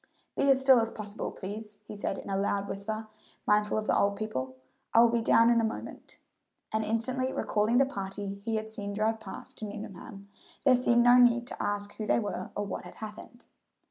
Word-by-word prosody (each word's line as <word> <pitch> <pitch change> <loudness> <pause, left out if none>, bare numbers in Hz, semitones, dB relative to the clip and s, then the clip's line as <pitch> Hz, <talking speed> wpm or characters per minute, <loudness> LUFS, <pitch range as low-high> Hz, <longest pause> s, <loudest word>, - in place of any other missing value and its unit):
"Be 280 - +2
as 270 -1 +5
still 265 -2 +6
as 225 0 0
possible, 210 -1 -6
please," 210 +2 -7
he - - -7
said 205 - -3
in - - -9
a 195 - -1
loud 200 0 0
whisper, 215 +3 -4 0.4
mindful 210 0 +2
of 215 - -1
the - - +2
old 200 0 +2
people; 130 -13 -4 0.4
"I 230 - +9
will 235 - +6
be 235 -1 +1
down 230 +1 +5
in 235 -1 +4
a - - -1
moment," 220 - -5 0.6
and 220 0 +1
instantly 255 +4 0
recalling 215 +1 +1
the 270 - +5
party 200 -4 -5
he 225 0 -1
had 220 0 -3
seen 205 -2 -5
drive 220 +2 0
past 195 -3 -9
to 215 - -4
Nuneham, 200 -1 -8 0.4
there 265 - +7
seemed 240 -1 +3
no 245 +1 +7
need 240 -1 +5
to - - -7
ask 205 0 -2
who 215 - -4
they - - +3
were 210 -3 -3
or 205 - -1
what 195 - -5
had 180 - -11
happened. 220 +3 -10
215 Hz, 210 wpm, -29 LUFS, 205-235 Hz, 0.6 s, I